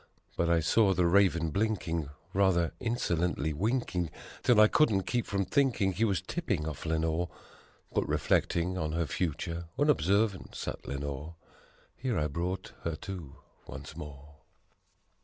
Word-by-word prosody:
But 85 - +1
I 85 -1 +4
saw 95 +4 +4
the 90 - +3
Raven 85 -3 +3
blinking 85 -6 -1 0.2
rather, 95 -4 +3
insolently 90 - 0
winking 95 - 0 0.3
'Till 120 -4 +4
I 110 - +9
couldn't 110 -8 +3
keep 120 +2 -1
from 100 -1 0
thinking 130 -8 +2
he 100 +5 +1
was 95 -8 0
tipping 75 - -2
off 80 +1 -5
Lenore; 80 +1 0 0.6
But - - 0
reflecting 90 +2 +1
on 80 -1 -2
her 85 0 +1
future, 85 +1 -2
unobservant 105 - +2
sat - - -5
Le 70 - -3
nore: 70 +3 -5 0.6
Here 125 -5 -1
I 75 - +1
brought 90 +5 -3
her 85 -1 -2
to, 85 -4 -7 0.3
once - - -8
more. 70 0 -10
90 Hz, 140 wpm, -30 LUFS, 80-100 Hz, 0.6 s, I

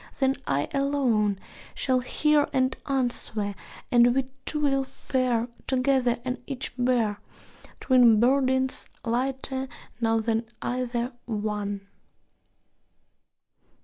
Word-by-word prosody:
Then 270 0 +3
I 140 +1 +1
alone 255 -8 +1 0.4
Shall 260 -2 +1
hear 295 +3 +2
and 260 0 +1
answer; 240 -6 -1 0.4
and 240 0 +5
we 265 -1 +1 0.2
two 300 - -1
will 275 -2 +2
fare 255 -3 -1 0.2
Together, 255 -2 +2
and 255 0 -3
each 270 -2 -4
bear 245 -5 +1 0.6
Twin 245 -4 +5
burdens, 260 +1 +2 0.2
lighter 265 +2 -1 0.3
now 225 -1 +2
than 225 +1 -1
either 245 0 -2
one. 210 -2 -3
250 Hz, 100 wpm, -26 LUFS, 230-265 Hz, 0.6 s, and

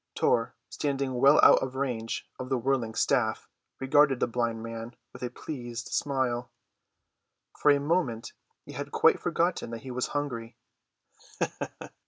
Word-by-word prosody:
Tor, 115 +1 +1
standing 140 -2 -2
well 140 +3 +6
out - - +8
of 130 0 -4
range 125 -4 -3
of 130 - -5
the 135 - +1
whirling 120 -3 0
staff, 115 -2 +1 0.3
regarded 135 0 +4
the - - +3
blind 115 -1 -2
man 115 +1 -7 0.2
with - - -11
a 125 - -2
pleased 120 -3 -6
smile. 130 -4 -1 1.1
For 150 - +5
the 140 - +4
moment 145 -7 -1 0.3
he - - -10
had - - -6
quite - - +4
forgotten 170 -4 0
that 115 -1 -7
he 130 - -6
was 125 0 -1
hungry. 120 -6 -4
125 Hz, 145 wpm, -28 LUFS, 115-140 Hz, 1.1 s, out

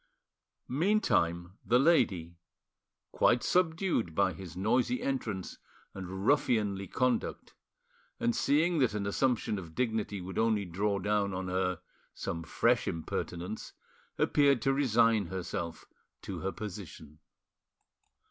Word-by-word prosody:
Meantime 105 - +1
the 120 - +3
lady, 95 - +2 0.7
quite 120 - +3
subdued 160 - +1
by 95 - +2
his 90 -3 -9
noisy 120 +5 +1
entrance 110 -9 -3 0.3
and 95 +1 -6
ruffianly 105 -8 +2
conduct, 125 +6 -1 0.7
and 235 -1 +1
seeing 165 -4 +2
that 125 -6 +2
an 100 -1 -2
assumption 110 -1 0
of 80 -3 -10
dignity 110 -4 -1
would 95 +2 -5
only 110 -3 +2
draw 100 +4 -1
down 100 0 0
on 95 0 -3
her 90 -1 -1 0.3
some 85 - -4
fresh - - +1
impertinence, 85 +4 -4 0.4
appeared 140 -3 +3
to 135 +4 +1
resign 115 -6 +3
herself 85 -2 -5 0.4
to - - -5
her 95 - -2
position. 85 -8 -8
105 Hz, 115 wpm, -31 LUFS, 90-125 Hz, 0.7 s, the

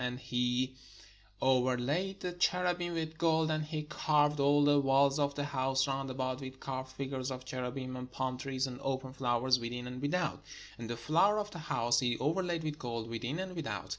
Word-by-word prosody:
And 125 0 -2
he 125 0 0 0.7
overlaid 130 +8 +2
the 180 - -2
cherubim 175 0 +1
with 160 -1 -3
gold. 160 -1 +3
And 155 0 0
he 155 0 -3
carved 150 -1 +2
all 145 +1 +5
the 145 0 +5
walls 135 +1 +4
of 140 -1 +1
the 145 - -1
house 135 -1 +1
round 135 0 -2
about 130 0 -2
with 130 0 -8
carved 130 -1 -4
figures 130 -1 -3
of 130 -1 -6
cherubim 130 0 -4
and 125 0 -7
palm 130 -1 -2
trees 130 0 -1
and 125 -1 -6
open 130 -1 -2
flowers, 125 0 +2
within 120 +1 -4
and 125 +1 -6
without. 170 +5 0 0.4
And 115 -1 -6
the 120 - -3
floor 170 - +3
of 210 -1 -2
the 175 - -7
house 120 -6 +2
he 120 -3 +1
overlaid 170 +3 0
with 155 0 -3
gold, 115 -3 -4
within 120 +6 -3
and 185 0 -4
without. 165 -4 -4
135 Hz, 195 wpm, -33 LUFS, 125-155 Hz, 0.7 s, all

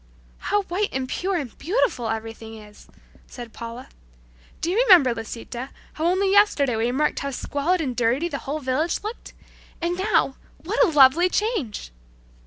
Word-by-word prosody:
"How 410 0 0
white 390 +3 -1
and 260 -1 -3
pure 380 +8 -2
and 275 -9 -4
beautiful 280 - 0
everything 225 0 -6
is!" 210 -1 -15 0.4
said 240 -3 -10
Paula. 235 +2 -8 0.7
"Do 335 - -1
you 390 - 0
remember, 330 - +7
Lisita, 235 +3 -7 0.2
how 320 +2 -1
only 380 +2 +2
yesterday 350 - +4
we 225 +1 0
remarked 280 +5 0
how 280 - -3
squalid 290 +6 -1
and 260 -5 -3
dirty 245 +7 +1
the 280 -5 -4
whole 285 +3 -4
village 295 +7 -1
looked? 435 +3 -7 0.5
And 345 +2 -2
now, 380 -9 +1 0.3
what 405 +8 +2
a - - +4
lovely 300 +3 +5
change!" 365 - -2
280 Hz, 160 wpm, -23 LUFS, 240-360 Hz, 0.7 s, remember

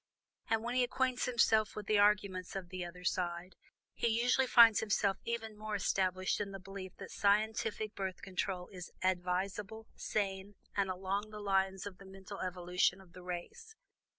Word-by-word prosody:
And, 225 0 +2
when 240 +1 -2
he 255 0 +3
acquaints 255 0 0
himself 225 -3 +3
with 210 - -5
the 210 0 +3
arguments 200 -3 +2
of 185 -2 -5
"the 185 0 -4
other 175 +1 -9
side" 175 0 -2 0.4
he - - 0
usually 245 +3 +3
finds 230 -3 +8
himself 200 -2 +1
even 225 -2 -3
more 215 0 -4
established 185 0 +1
in 200 - -2
the 195 - -6
belief 190 0 -8
that 195 - -9
scientific 215 +1 +1
Birth 190 -2 -4
Control 185 -1 -2
is 180 -2 -8
advisable, 190 +4 -1
sane, 195 -1 -2 0.2
and 200 -1 +1
along 195 +3 -2
the 215 0 -8
lines 195 -1 +1
of 200 -3 -7
the 195 - -12
mental 195 +1 -9
evolution 180 0 +1
of 185 -2 -17
the 180 - -11
race. 180 - -7
195 Hz, 170 wpm, -34 LUFS, 185-215 Hz, 0.4 s, finds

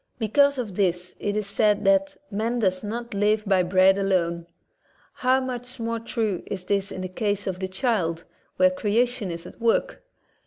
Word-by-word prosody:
Because 280 +5 +3
of 225 -6 -4
this 180 -2 0
it 205 0 -2
is 210 -1 -1
said 210 +1 +1
that 195 0 +3 0.2
''Man 230 +4 -1
does 185 -4 +1
not 235 +2 -5
live 210 +2 +1
by 195 -2 +3
bread 185 +2 +4
alone." 170 -3 0 0.7
How 255 +1 +2
much 250 -1 -5
more 230 0 -2
true 220 -5 -2
is 185 -2 -5
this 200 0 0
in 185 - -5
the 185 - -3
case 205 +2 -2
of 185 -2 -3
the 190 - -2
child, 185 -6 -1 0.3
where 185 0 +4
creation 220 +2 0
is 170 0 -5
at - - -12
work? 235 - +1
205 Hz, 180 wpm, -25 LUFS, 185-230 Hz, 0.7 s, bread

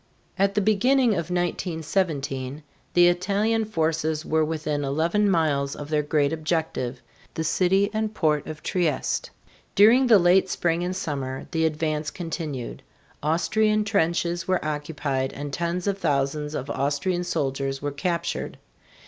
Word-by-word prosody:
At 200 +1 +1
the 210 - +3
beginning 235 +5 +3
of 170 -5 -1
1917 160 -6 -2 0.3
the 175 0 +7
Italian 200 +5 +1
forces 160 -4 -1
were 160 0 +2
within 155 -2 -2
eleven 165 +9 +1
miles 145 -6 +1
of 145 0 -8
their 155 -1 +2
great 145 0 +1
objective, 155 -6 -2 0.3
the 160 - -1
city 190 +5 +2
and 215 0 -1
port 155 -8 0
of 155 0 -7
Trieste. 165 -7 -1 0.5
During 235 +6 +6
the 225 -3 +8
late 185 +1 +4
spring 170 -1 0
and 180 +1 -2
summer 140 -7 -4
the 160 -2 +1
advance 155 -1 -2
continued. 160 -7 -5 0.4
Austrian 215 +7 +2
trenches 175 -4 0
were 185 -4 0
occupied 145 -3 -2
and 145 0 -6
tens 170 +3 -2
of 200 -1 -1
thousands 150 -1 0
of 140 +1 -4
Austrian 145 +6 0
soldiers 135 -5 -2
were 145 +1 -3
captured. 170 +3 -2
160 Hz, 140 wpm, -25 LUFS, 145-185 Hz, 0.5 s, the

